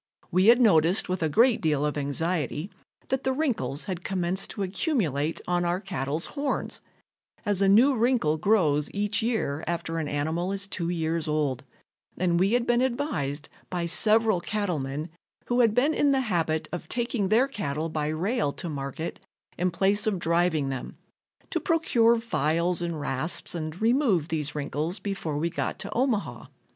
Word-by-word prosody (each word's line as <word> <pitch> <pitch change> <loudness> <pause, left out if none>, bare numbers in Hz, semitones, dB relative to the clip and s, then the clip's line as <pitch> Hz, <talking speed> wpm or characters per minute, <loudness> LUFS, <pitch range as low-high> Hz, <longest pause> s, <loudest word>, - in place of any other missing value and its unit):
We 185 +3 +3
had 235 +2 +7
noticed 185 -5 +4
with 185 -1 -1
a 160 - +1
great 235 - +4
deal 150 -3 +1
of 150 - -1
anxiety 150 - -2 0.4
that 265 0 -1
the 265 - +1
wrinkles 230 - -1
had 180 -2 -5
commenced 185 0 -2
to 205 - -4
accumulate 180 - -1
on 175 0 +1
our 175 +1 0
cattle's 165 -5 -2
horns, 285 -2 -2 0.6
as 205 -2 +1
a 195 - +4
new 250 +8 +6
wrinkle 225 -10 +2
grows 155 -9 +2
each 205 +2 +1
year 220 -11 -1
after 165 -1 -2
an 155 - -2
animal 160 +6 -1
is 200 0 -2
two 175 -3 -3
years 165 -1 -1
old, 150 -4 0 0.5
and 175 -1 +1
we 195 +4 +2
had 245 -1 +2
been 240 0 +2
advised 235 - -2 0.2
by 175 -2 -2
several 215 +2 +3
cattlemen 160 -8 -3 0.3
who 245 0 0
had 225 -3 +4
been 280 +6 +3
in 290 -2 +3
the 270 -1 +2
habit 165 -8 -1
of 175 - -6
taking 235 -5 -1
their 235 +6 +4
cattle 160 - -3
by 155 -2 -2
rail 170 - 0
to - - -6
market 145 +1 -5 0.4
in 180 +2 0
place 200 +5 +1
of 210 -3 +1
driving 170 -4 +1
them, 130 -1 -6 0.5
to - - 0
procure 235 -9 +3
files 170 -5 0
and 170 -2 -3
rasps 145 +3 -1
and 160 0 -5
remove 225 - +2
these 150 -2 -2
wrinkles 150 +5 -2
before 195 -7 -3
we 160 +3 0
got - - -2
to - - -5
Omaha. 235 -4 -1
175 Hz, 170 wpm, -27 LUFS, 155-220 Hz, 0.6 s, had